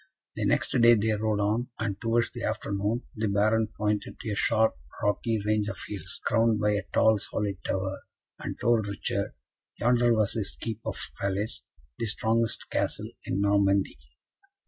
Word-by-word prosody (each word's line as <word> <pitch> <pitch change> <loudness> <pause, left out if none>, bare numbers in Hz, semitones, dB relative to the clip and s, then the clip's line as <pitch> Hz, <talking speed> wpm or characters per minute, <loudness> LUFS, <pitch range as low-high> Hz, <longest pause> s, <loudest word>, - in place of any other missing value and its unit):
The - - -1
next - - +1
day 120 0 +8
they 110 +1 +1
rode 105 0 0
on, 110 +4 +1
and, 100 -3 -3
towards 115 0 +1
the - - -7
afternoon, 105 +5 -1
the 110 0 -1
Baron 110 +2 +2
pointed 105 -1 -2
to 110 - -4
a - - -1
sharp 110 +1 +3 0.3
rocky 110 +2 +1
range 105 -1 +1
of - - -4
hills, 95 -3 -6
crowned 115 -2 +3
by 105 0 +2
a 100 -1 +1
tall 110 -1 +4
solid 100 -2 -3
tower, 95 0 -2 0.4
and - - -5
told 115 -3 +2
Richard, 100 -1 -2 0.4
yonder 120 0 +3
was 110 -2 +2
his - - -3
keep 115 - -4
of - - -2 0.2
Falaise, 100 +2 -2 0.3
the 115 - -1
strongest 115 0 0
Castle - - -1
in 100 - -1
Normandy. 100 -6 +2
105 Hz, 165 wpm, -28 LUFS, 100-115 Hz, 0.4 s, day